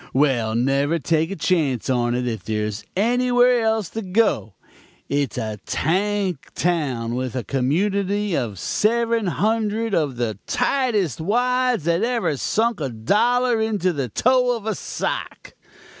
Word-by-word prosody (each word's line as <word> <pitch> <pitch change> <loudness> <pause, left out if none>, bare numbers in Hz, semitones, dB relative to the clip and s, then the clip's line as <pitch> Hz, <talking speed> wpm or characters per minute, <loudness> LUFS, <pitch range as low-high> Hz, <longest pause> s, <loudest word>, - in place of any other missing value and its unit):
Well, 125 -6 +2
never 140 +6 +1
take 160 0 0
a 195 - -4
chance 155 - 0
on 120 -2 +1
it 125 0 -1
if 110 -6 -3
there 105 -1 -1
is 105 0 -5
anywhere 245 +3 +3
else 220 -4 0
to 225 - -5
go. 190 - 0 0.5
It's 140 -2 -1
a 110 -1 -3
tank 190 -2 -1
town 140 -9 -1
with 130 0 -3
a 125 - -2
community 195 - 0
of 115 -7 -2
seven 230 - +1
hundred 220 +3 0
of 150 -7 +1
the 115 -4 -3
tightest 210 - 0
wads 245 +2 +1
that 170 +2 +1
ever 230 -9 0
sunk 225 - 0
a 135 - -1
dollar 225 - +2
into 205 -5 0
the 135 -5 -3
toe 250 - +2
of 220 - -12
a 220 - 0
sock. - - -5
180 Hz, 145 wpm, -22 LUFS, -, 0.5 s, anywhere